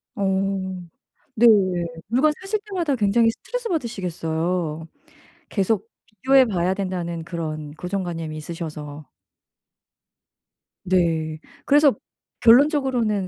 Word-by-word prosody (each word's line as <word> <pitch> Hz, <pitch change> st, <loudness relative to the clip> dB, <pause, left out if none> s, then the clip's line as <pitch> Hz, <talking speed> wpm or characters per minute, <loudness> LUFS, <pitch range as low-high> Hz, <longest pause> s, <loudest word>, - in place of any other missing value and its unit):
어. 190 Hz, -2 st, -1 dB, 0.5 s
네. 235 Hz, +2 st, +4 dB, 0.6 s
물건 275 Hz, +7 st, +3 dB
사실 405 Hz, +2 st, -2 dB
때마다 345 Hz, -9 st, -1 dB
굉장히 225 Hz, +1 st, +3 dB
스트레스받으시겠어요, 180 Hz, -, -3 dB, 0.6 s
계속 210 Hz, +2 st, 0 dB, 0.2 s
비교해 260 Hz, +4 st, +4 dB
봐야 185 Hz, -4 st, 0 dB
된다는 175 Hz, -4 st, -4 dB
그런 155 Hz, -3 st, -5 dB
고정관념이 175 Hz, -3 st, -4 dB
있으셔서. 155 Hz, -2 st, -7 dB, 1.8 s
네. 165 Hz, -4 st, +1 dB, 0.3 s
그래서 290 Hz, -1 st, +5 dB, 0.5 s
결론적으로는 245 Hz, -, +4 dB
190 Hz, 240 characters per minute, -23 LUFS, 165-240 Hz, 1.8 s, 그래서